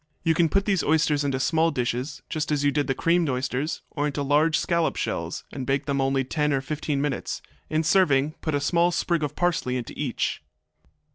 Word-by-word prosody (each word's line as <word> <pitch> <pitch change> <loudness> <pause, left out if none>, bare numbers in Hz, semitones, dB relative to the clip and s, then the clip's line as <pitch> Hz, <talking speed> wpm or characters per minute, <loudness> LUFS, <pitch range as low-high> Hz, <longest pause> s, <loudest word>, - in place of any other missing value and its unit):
You 165 - +3
can 165 0 +3
put 195 +3 +1
these 195 -5 +2
oysters 150 -1 +2
into 135 -2 -1
small 160 +4 +2
dishes, 125 +2 -3
just 155 -1 -3
as 145 -1 +1
you 145 - +3
did 145 0 0
the 135 - 0
creamed 170 0 +2
oysters, 130 +4 -2
or 145 -1 -1
into 145 0 -2
large 150 +3 +3
scallop 170 -2 +1
shells, - - -3
and 135 - -5
bake 135 +2 0
them 140 -1 0
only 135 0 +1
ten 150 +3 0
or 135 - +1
fifteen 145 +1 -2
minutes. 145 -3 -2 0.3
In 155 +1 +1
serving, 155 -5 +3
put 155 -2 -1
a - - +2
small 170 +4 +2
sprig 170 -1 0
of 150 -2 -3
parsley 165 -8 0
into 120 - -6
each. 140 -5 -2
150 Hz, 205 wpm, -25 LUFS, 135-160 Hz, 0.3 s, You